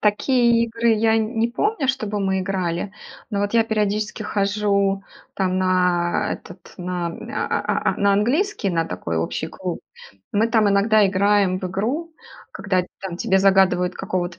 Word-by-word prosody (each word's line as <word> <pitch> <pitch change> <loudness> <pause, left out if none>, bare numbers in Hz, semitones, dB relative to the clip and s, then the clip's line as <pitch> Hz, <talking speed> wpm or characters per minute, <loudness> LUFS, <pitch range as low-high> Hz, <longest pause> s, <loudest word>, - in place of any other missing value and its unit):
такие 235 +2 +3
игры 230 0 +1
я 220 +1 +2
не 225 +1 0
помню, 295 - -1
чтобы 215 -6 -1
мы 190 -1 0
играли. 185 0 -2 0.4
Но 200 -2 -1
вот 205 0 -1
я 230 -1 +4
периодически 215 0 -1
хожу 200 -1 0 0.3
там 185 -1 0
на 180 -2 +1
этот 180 +1 -14
на 180 -1 -3
а 165 - -3
а - - 0
а - - -13
на 200 0 +4
английский, 245 - +1
на 165 -2 0
такой 90 - -4
общий 80 +1 -2
клуб. - - -5 0.5
Мы 215 +2 +3
там 220 -2 +3
иногда 205 +2 +4
играем 195 -1 +2
в 185 - -7
игру, 255 - -3 0.4
когда 190 -2 -1 0.2
там 190 -3 -5
тебе 190 +2 +2
загадывают 190 -2 +3
какого-то 180 -2 -3
200 Hz, 155 wpm, -22 LUFS, 185-220 Hz, 0.5 s, я